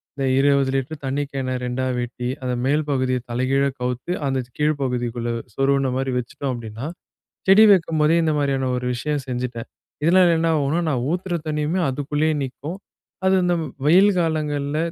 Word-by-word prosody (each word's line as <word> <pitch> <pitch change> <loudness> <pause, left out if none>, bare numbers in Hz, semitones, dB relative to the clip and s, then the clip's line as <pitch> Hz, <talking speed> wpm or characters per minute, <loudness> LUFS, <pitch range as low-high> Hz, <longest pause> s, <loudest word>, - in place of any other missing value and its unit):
இந்த 135 - -2
20 140 -1 +3
லிட்டர் 140 +2 -3
தண்ணி 140 +2 -1
கேனை 130 -2 -2
2 125 +1 -2
வெட்டி, 120 0 -4 0.2
அந்த 125 -1 -1
மேல் 150 +3 +2
பகுதியைத் 130 -2 -1
தலைகீழா 135 +3 +1
கவுத்து, 125 +6 -3
அந்த 135 -1 0 0.2
கீழ் 150 -1 +1
பகுதிக்குள்ள 120 -2 -2 0.3
சொருவுன்ன 135 -1 +2
மாரி 135 0 -1
வெச்சுட்டோம் 125 +2 -3
அப்டின்னா, 115 +4 -6 0.6
செடி 210 +3 +8
வைக்கும்போதே 160 -3 +3
இந்த 160 -1 +2
மாரியான 135 -2 0
ஒரு 125 0 -3
விஷயம் 145 +2 -2
செஞ்சிட்டேன். 125 -2 -4 0.4
இதனால 175 0 +5
என்ன 165 - +1
ஆகும்னா 150 +3 +1
நான் 125 -5 0
ஊத்துற 180 0 -2
தண்ணிமே 155 +3 -1
அதுக்குள்ளே 145 +3 0
நிக்கும். 140 +5 -5 0.5
அது 190 0 +4
இந்த 175 0 +2 0.3
வெயில் 190 +6 +6
காலங்கள்ல 150 -3 -1
140 Hz, 155 wpm, -22 LUFS, 130-155 Hz, 0.6 s, செடி